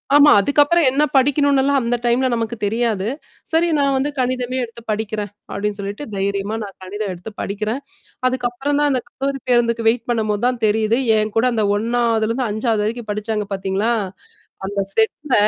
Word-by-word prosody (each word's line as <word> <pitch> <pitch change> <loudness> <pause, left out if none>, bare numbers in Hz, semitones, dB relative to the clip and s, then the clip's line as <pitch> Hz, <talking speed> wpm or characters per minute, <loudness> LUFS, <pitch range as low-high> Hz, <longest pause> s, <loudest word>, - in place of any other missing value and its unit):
ஆமா. 290 0 +8
அதுக்கப்புறம் 290 +6 +3
என்ன 280 +3 +2
படிக்கணும்னுலாம் 280 0 +3
அந்த 240 +1 0
டைம்ல 250 +2 +3
நமக்கு 230 0 -2
தெரியாது. 215 -2 0 0.4
சரி 330 +2 +3
நான் 275 -1 +2
வந்து 280 +3 0
கணிதமே 255 0 -1
எடுத்து 235 0 -9
படிக்கிறேன் 210 -1 -3 0.2
அப்டின்னு 205 +1 -2
சொல்லிட்டு 200 +8 -5
தைரியமா 200 +2 -1
நான் 200 - -9
கணிதம் 200 +1 -4
எடுத்து 180 +5 -9
படிக்கிறேன் 215 +6 -3 0.5
அதுக்கப்புறம் 255 +3 -1
தான் 295 -1 +3
அந்த 255 - +1
கல்லூரி 275 0 -3
பேருந்துக்கு 235 -2 +2
வெயிட் 235 +1 0
பண்ணும்போது 215 -2 0
தான் 250 -2 0
தெரியுது, 220 +2 +2 0.2
என்கூட 215 +2 +1
அந்த 220 -2 +1
1வதுலருந்து 230 0 +1 0.2
5வது 220 0 0
வரைக்கும் 225 -1 -3
படிச்சாங்க 210 0 -2
பார்த்தீங்களா? 195 +4 0 0.8
அந்த 200 0 -3 0.2
செட்ல 250 +5 0
230 Hz, 150 wpm, -20 LUFS, 210-260 Hz, 0.8 s, ஆமா